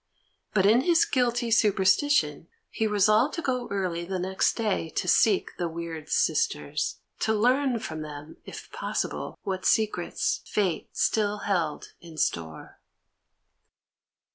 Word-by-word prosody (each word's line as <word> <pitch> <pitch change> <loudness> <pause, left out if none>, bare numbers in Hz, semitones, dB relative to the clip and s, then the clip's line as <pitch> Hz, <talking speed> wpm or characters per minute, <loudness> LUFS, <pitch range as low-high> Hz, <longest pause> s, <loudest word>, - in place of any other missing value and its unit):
But 190 -2 +4
in 225 +5 +5
his 340 +2 +4
guilty 240 -2 0
superstition 190 - +2 0.2
he 220 - 0
resolved 215 +6 +3
to 330 - -4
go 250 -2 -1
early 185 -4 -2
the 185 +2 -3
next 190 +1 +1
day 210 -7 -1
to 180 - -3
seek 200 +1 +3
the 175 - 0
weird 165 -1 -7
sisters, 75 -1 0 0.2
to 220 - +1
learn 250 +3 +2
from 160 -8 -6
them, 150 0 -9
if - - -10
possible, - - -3
what 190 -1 -3
secrets 215 -5 0
fate 195 -5 -1
still 210 -1 +1
held 175 -7 -2
in 165 -2 -12
store. 80 - -3
200 Hz, 130 wpm, -27 LUFS, 170-225 Hz, 0.2 s, in